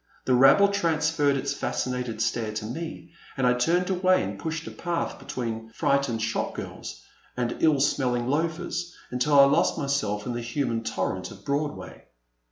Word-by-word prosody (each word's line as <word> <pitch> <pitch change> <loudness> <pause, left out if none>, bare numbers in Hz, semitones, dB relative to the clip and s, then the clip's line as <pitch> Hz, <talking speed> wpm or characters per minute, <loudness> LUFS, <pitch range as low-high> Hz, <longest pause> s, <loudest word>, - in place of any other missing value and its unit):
The 130 - +2
rabble 135 +11 +6
transferred 160 -6 +1
its - - -2
fascinated 125 -3 -2
stare 115 -1 -1
to 105 0 -4
me, 160 +6 -6 0.3
and 130 - +1
I 125 - +5
turned 170 +9 +1
away 185 0 +3
and - - -5
pushed 160 -1 -4
a - - -7
path 175 -1 -3
between 115 -2 -5
fright 140 0 +2
ened 115 -3 -2
shop 110 +1 -2
girls - - -7 0.3
and 120 -1 -1
ill 155 -3 +4
smelling 125 -3 +1
loafers, 170 +4 -2 0.2
until 140 +3 +3
I - - +10
lost 140 +4 +2
myself 125 -9 -1
in 125 - -2
the 120 - -3
human 120 -1 -2
torrent - - -2
of - - -13
Broadway. 145 +1 -3
140 Hz, 170 wpm, -26 LUFS, 120-160 Hz, 0.3 s, I